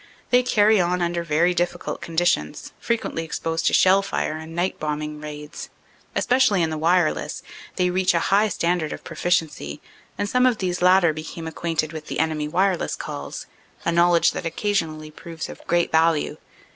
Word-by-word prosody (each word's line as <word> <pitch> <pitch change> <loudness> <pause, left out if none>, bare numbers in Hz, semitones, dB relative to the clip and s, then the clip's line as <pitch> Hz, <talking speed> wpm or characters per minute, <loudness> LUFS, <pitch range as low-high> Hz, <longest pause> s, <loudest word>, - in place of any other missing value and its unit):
They 250 0 +6
"carry 215 -4 +4
on" 180 +1 0
under 170 0 -1
very 170 +3 +2
difficult 175 0 -2
conditions, 165 - -1
fre - - 0
quently 190 -7 -4
exposed 165 0 -2
to - - +2
shell 190 +1 +5
fire 195 -5 -2
and 160 +1 -8
night 180 +2 -1
bombing 150 0 -4
raids. 150 0 -8 0.5
Espe 250 - +2
cially 250 -8 +4
in 160 - 0
the 155 - -3
wireless, 170 0 +1 0.3
they 180 -1 +1
reach 185 -1 +2
a - - +3
high 210 +2 +4
standard 170 -3 -1
of - - -9
proficiency 160 - -1 0.4
and 205 - -1
some 250 +4 +3
of 245 -3 +1
these 180 -3 -2
latter 180 -2 +5
become 160 +1 -7
acquainted 160 -1 -2
with 155 -1 -7
the - - -4
enemy 155 -1 0
wireless 180 +3 0
calls, - - -6 0.4
a - - +2
knowledge 170 0 +4
that - - -5
occasionally 165 -4 -2
proves 165 +1 -8
of - - -10
great 175 0 +1
value. 160 -1 +2
170 Hz, 175 wpm, -23 LUFS, 155-185 Hz, 0.5 s, They